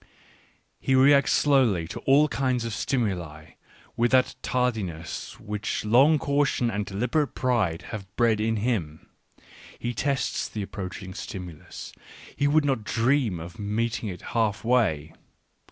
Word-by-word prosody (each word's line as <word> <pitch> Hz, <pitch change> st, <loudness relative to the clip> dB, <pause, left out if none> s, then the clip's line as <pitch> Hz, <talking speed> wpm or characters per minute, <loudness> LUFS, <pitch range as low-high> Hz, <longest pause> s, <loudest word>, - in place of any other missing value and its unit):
He 130 Hz, -, +1 dB
reacts 140 Hz, +2 st, +5 dB
slowly 125 Hz, -, +3 dB
to -, -, -6 dB
all 145 Hz, +3 st, +6 dB
kinds 130 Hz, -4 st, -1 dB
of 115 Hz, -, -3 dB
stimuli, 90 Hz, -, -2 dB, 0.4 s
with 120 Hz, +1 st, +2 dB
that 130 Hz, 0 st, +3 dB
tardiness 100 Hz, -11 st, -2 dB
which 105 Hz, 0 st, -3 dB
long 135 Hz, +8 st, +5 dB
caution 140 Hz, -4 st, +1 dB
and 105 Hz, -1 st, -3 dB
deliberate 125 Hz, +9 st, -1 dB
pride 110 Hz, -10 st, 0 dB
have 100 Hz, -3 st, -6 dB
bred 115 Hz, -3 st, +2 dB
in 115 Hz, +1 st, +1 dB
him 100 Hz, -9 st, -2 dB, 0.3 s
— -, -, -19 dB
he 120 Hz, +1 st, -3 dB
tests 135 Hz, +1 st, -1 dB
the 105 Hz, -, -4 dB
approaching 95 Hz, -1 st, -7 dB
stimulus; 90 Hz, -5 st, -8 dB, 0.4 s
he 145 Hz, -, +1 dB
would 150 Hz, +1 st, +3 dB
not 135 Hz, -6 st, 0 dB
dream 115 Hz, -, +1 dB
of 85 Hz, +6 st, -9 dB
meeting 110 Hz, +2 st, -2 dB
it 90 Hz, -2 st, -8 dB
half 110 Hz, -3 st, 0 dB
way. 105 Hz, -11 st, +1 dB
115 Hz, 135 wpm, -26 LUFS, 95-130 Hz, 0.4 s, all